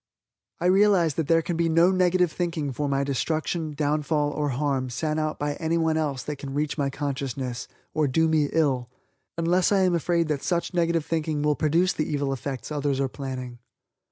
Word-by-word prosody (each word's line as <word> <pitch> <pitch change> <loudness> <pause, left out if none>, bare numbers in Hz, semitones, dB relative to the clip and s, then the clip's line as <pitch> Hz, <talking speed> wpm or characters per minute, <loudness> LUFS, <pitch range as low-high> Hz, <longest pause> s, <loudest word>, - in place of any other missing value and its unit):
I 170 - -2
realize 185 -4 +4
that 160 0 -2
there 165 0 +3
can 175 - -2
be 165 0 +1
no 165 +3 +5
negative 180 -2 +2
thinking 165 -4 -2
for 145 +3 -2
my 140 0 +1
destruction, 155 +3 -2
downfall 150 0 0
or 145 0 -1
harm 135 -1 -1
sent 155 +5 -2
out 155 0 -1
by 145 0 -1
anyone 160 -1 +1
else 145 -5 -1
that 150 +1 -5
can 135 0 -7
reach 150 0 -1
my 140 -3 0
consciousness, 135 -3 -4 0.3
or 155 -1 +2
do 160 +5 +2
me 155 -2 +2
ill, 135 -6 +1 0.5
unless 175 +3 +2
I 200 -1 +4
am 185 -1 +3
afraid 170 0 +1
that 145 -3 -1
such 175 0 -1
negative 170 -2 +1
thinking 155 -2 -1
will 150 0 +2
produce 165 +5 +2
the 155 - -2
evil 140 -2 0
effects 135 0 -5
others 145 -2 -1
are 135 -1 0
planning. 130 -3 -6
150 Hz, 190 wpm, -25 LUFS, 140-165 Hz, 0.5 s, no